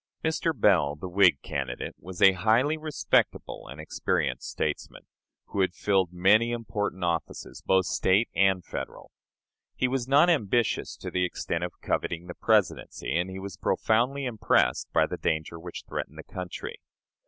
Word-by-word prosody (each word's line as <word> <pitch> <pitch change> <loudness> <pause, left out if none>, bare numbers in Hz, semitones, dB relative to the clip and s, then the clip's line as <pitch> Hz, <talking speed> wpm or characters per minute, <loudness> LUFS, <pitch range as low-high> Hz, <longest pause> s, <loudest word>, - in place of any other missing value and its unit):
Mr. 160 +1 +1
Bell, 80 -9 +4
the 85 +5 -7
Whig 90 -5 +4
candidate, 65 -3 -4
was 90 0 -4
a 95 - +9
highly 110 - +2
respectable 155 - -1
and 65 +6 -9
experienced 75 - -2
statesman, - - -3 0.5
who 100 - -1
had 95 -1 +1
filled 95 -4 +1
many 100 +6 +4
important 105 -5 -3
offices, 85 -1 -3
both 95 -1 +3
State 95 +6 +2
and 95 -2 +3
Federal. - - -7 0.6
He 130 - +1
was 130 -1 -2
not 140 +5 +5
ambitious 120 - +1
to - - -7
the 90 - +1
extent 90 - -2
of - - -6
coveting 85 +1 -2
the 90 - -7
Presidency, 100 - 0
and 90 +2 0
he 95 - -7
was 95 -3 -7
profoundly 125 - +1
impressed 110 - +1
by - - +4
the - - -5
danger 80 +1 -2
which 85 +1 -8
threatened - - -5
the - - -8
country. 90 -1 -7
95 Hz, 155 wpm, -27 LUFS, 90-115 Hz, 0.6 s, a